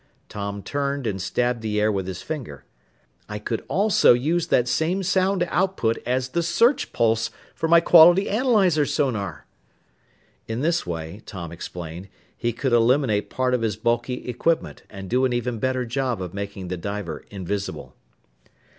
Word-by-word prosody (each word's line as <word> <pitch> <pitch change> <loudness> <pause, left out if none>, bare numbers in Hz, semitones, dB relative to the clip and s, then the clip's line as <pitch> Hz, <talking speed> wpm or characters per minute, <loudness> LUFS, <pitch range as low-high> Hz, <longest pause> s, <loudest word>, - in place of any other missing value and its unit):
Tom 100 -1 -5
turned 140 -1 -2
and 95 -4 -2
stabbed 120 +4 -1
the 105 -1 -1
air 105 +1 +3
with 95 -2 -2
his 95 -1 -6
finger. 130 - -6 0.6
"I 105 - -4
could 110 +2 -4
also 200 - +4
use 155 +8 0
that 125 - +2
same 170 +9 0
sound 190 0 +2
output 170 -11 0
as 130 +1 0
the 170 +6 0
search 235 - +2
pulse 115 0 +1 0.2
for 160 - -2
my 170 +1 +6
quality 175 +3 +7
analyzer 205 - +3
sonar!" 115 -9 -2 1.0
In 115 +2 -3
this 165 - 0
way, 80 +4 -5
Tom 85 -4 -7
explained, 85 +1 -8 0.3
he 120 - -1
could 125 +2 -2
eliminate 120 -2 +3
part 130 -1 0
of 125 - +1
his 110 -3 0
bulky 120 +2 -1
equipment 155 +7 -1
and 95 -2 -8
do 125 +6 +1
an 130 -1 +2
even 120 -1 -2
better 130 +1 0
job 125 -1 -2
of 90 -1 -6
making 100 -2 -6
the 90 - -3
diver 100 -2 -5
"invisible." 100 0 -5
120 Hz, 160 wpm, -23 LUFS, 100-155 Hz, 1.0 s, quality